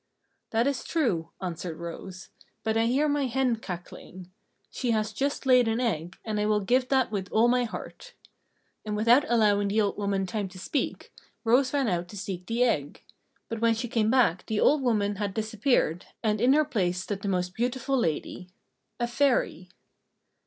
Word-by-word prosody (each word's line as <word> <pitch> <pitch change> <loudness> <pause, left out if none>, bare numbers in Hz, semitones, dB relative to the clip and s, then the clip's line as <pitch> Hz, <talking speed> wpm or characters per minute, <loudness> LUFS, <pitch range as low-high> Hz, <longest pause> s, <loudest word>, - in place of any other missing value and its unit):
"That 230 +1 +1
is 280 -2 -1
true," 190 - 0
answered 170 -2 -4
Rose, 180 +3 -8 0.3
"but 220 0 0
I 225 0 +2
hear 275 +5 +2
my 285 -2 +1
hen 250 -1 +1
cackling. 180 -2 -9 0.4
She 250 - -3
has 215 -1 0
just 280 +4 -2
laid 250 -2 +5
an 225 +1 0
egg, 175 -8 -2
and 215 -2 -2
I 210 - +1
will 210 -1 +2
give 250 +6 +2
that 265 -4 +2
with 195 -3 -4
all 225 +2 +4
my 245 0 +2
heart!" 485 - -9 0.7
And 210 -1 -3
without 235 +7 +4
allowing 210 -3 +3
the 205 +2 +1
old 205 -1 0
woman 200 -1 0
time 205 0 -3
to 185 0 -13
speak, 235 +10 -3 0.3
Rose 255 +3 +3
ran 280 -3 +1
out 175 -3 -1
to 205 - -10
seek 185 -2 -5
the 235 +2 +1
egg. 150 - -1 0.4
But 230 -1 -5
when 230 -1 +3
she 230 +2 -3
came 225 -3 +1
back 230 -8 +3
the 215 -1 -1
old 295 0 +4
woman 205 -5 +1
had 200 -1 -3
disappeared, 220 - 0 0.2
and 215 -1 +1
in 255 +2 +5
her 305 +1 +4
place 180 -7 -1
stood 195 +1 -4
the 200 - -4
most 180 -2 -1
beautiful 250 +4 -1
lady 180 - -2 0.5
a 240 - +1
Fairy. 240 -8 0
220 Hz, 185 wpm, -27 LUFS, 190-250 Hz, 0.7 s, laid